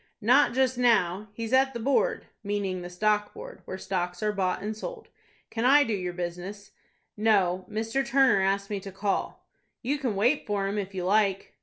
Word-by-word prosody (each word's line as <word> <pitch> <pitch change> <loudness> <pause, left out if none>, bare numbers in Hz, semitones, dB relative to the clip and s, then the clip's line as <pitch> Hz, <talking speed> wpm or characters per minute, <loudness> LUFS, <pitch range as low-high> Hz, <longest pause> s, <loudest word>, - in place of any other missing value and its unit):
"Not 245 +5 +4
just 260 -1 +1
now; 210 -5 +2
he's 225 +3 -5
at 270 0 +3
the - - -3
Board,"—meaning 205 - -1
the 175 - -7
Stock 210 +3 0
Board, - - -10
where 185 - -6
stocks 180 -1 -3
are 210 - +2
bought 185 -2 -1
and 215 +1 -3
sold. 455 - -8 0.4
"Can 225 - -2
I 285 +4 +6
do 230 - -2
your 180 -3 -2
business?" 180 +3 -6 0.4
"No; 190 -4 +2
Mr. 225 +5 -1
Turner 265 -6 +3
asked 200 +1 0
me 205 - -1
to 195 0 -9
call." 195 +1 -3 0.4
"You 280 +4 -1
can 250 -7 -2
wait 245 +9 +1
for 205 -2 -1
him, 200 +2 -1
if 195 -1 -6
you 180 -1 -3
like." 195 0 +1
205 Hz, 185 wpm, -27 LUFS, 190-235 Hz, 0.4 s, I